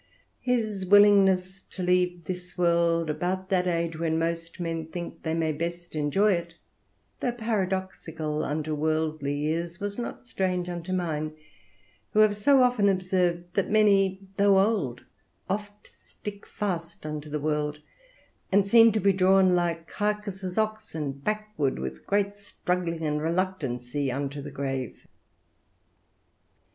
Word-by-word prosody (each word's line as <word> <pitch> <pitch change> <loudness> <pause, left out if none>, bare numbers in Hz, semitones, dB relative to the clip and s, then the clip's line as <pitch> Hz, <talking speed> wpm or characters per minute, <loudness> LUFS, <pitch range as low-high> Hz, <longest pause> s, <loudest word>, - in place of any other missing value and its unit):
His 220 -6 -1
willingness 195 -1 +5
to 185 - -5
leave 180 -1 +1
this 180 +2 -7
world 170 -1 +2
about 185 +4 -2
that 185 -2 +2
age 170 -1 0
when 160 -1 0
most 165 +1 -3
men 165 -2 -3
think 170 +1 -7
they 160 0 -1
may 160 -1 +1
best 170 +3 -4
enjoy 195 +8 +3
it, 170 -1 -4 0.6
though 245 - -1
paradoxical 190 -8 -2
unto 155 +1 -2
worldly 155 -2 -1
ears, 170 +2 -2
was 205 +2 -4
not 120 - -6
strange 180 +6 -1
unto 175 +1 -5
mine, 155 -4 -1 0.8
who 215 - +5
have 215 -1 +5
so 260 +6 +5
often 245 -5 +3
observed 180 -2 0
that 200 - 0
many, 195 -3 +4 0.2
though 200 -1 +5
old, 190 - +1 0.4
oft 205 +1 -4
stick 205 -1 -10
fast 170 -6 -4
unto 150 0 -5
the 150 +1 -2
world, 150 0 -1 0.7
and 200 0 +4
seem 230 +2 +7
to 215 - +1
be 195 0 +3
drawn 190 0 +4
like 170 -2 -1
Cacus's 205 -3 -3
oxen, 215 -9 -2
backward 210 -1 -2
with 65 0 -6
great 200 0 +1
struggling 180 -5 -3
and 150 0 0
reluctancy 145 -7 -1
unto 140 +2 -3
the 145 - -7
grave. 135 -3 -4
180 Hz, 135 wpm, -27 LUFS, 155-200 Hz, 0.8 s, seem